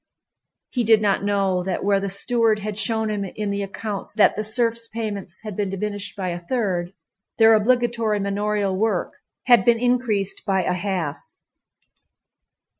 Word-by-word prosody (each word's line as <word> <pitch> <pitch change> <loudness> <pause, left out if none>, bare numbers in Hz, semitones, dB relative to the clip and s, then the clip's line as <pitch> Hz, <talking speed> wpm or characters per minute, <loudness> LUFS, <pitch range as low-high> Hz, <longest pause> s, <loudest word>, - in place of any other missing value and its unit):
He 245 - 0
did 220 -1 +5
not 200 -2 +1
know 195 -2 +1
that 185 +1 -3
where 200 -1 +3
the 200 0 -3
steward 225 +2 +2
had 210 0 -5
shown 220 +1 0
him 205 -1 -2
in 200 +2 -4
the 200 0 -2
accounts 200 +1 -5
that 215 - +4
the 215 - -2
serfs' 230 +1 0
payments 205 -5 -5
had 215 -3 -6
been 205 -1 -1
diminished 205 +1 -4
by 190 -3 -3
a 175 0 -4
third, 180 -3 -2 0.4
their 225 0 +7
obligatory 230 -1 +2
manorial 200 0 -1
work 205 -2 -1 0.3
had 240 -2 +5
been 235 -1 +4
increased 240 -5 0
by 190 -3 +1
a 180 - 0
half. 180 -5 -4
205 Hz, 160 wpm, -22 LUFS, 195-225 Hz, 0.4 s, their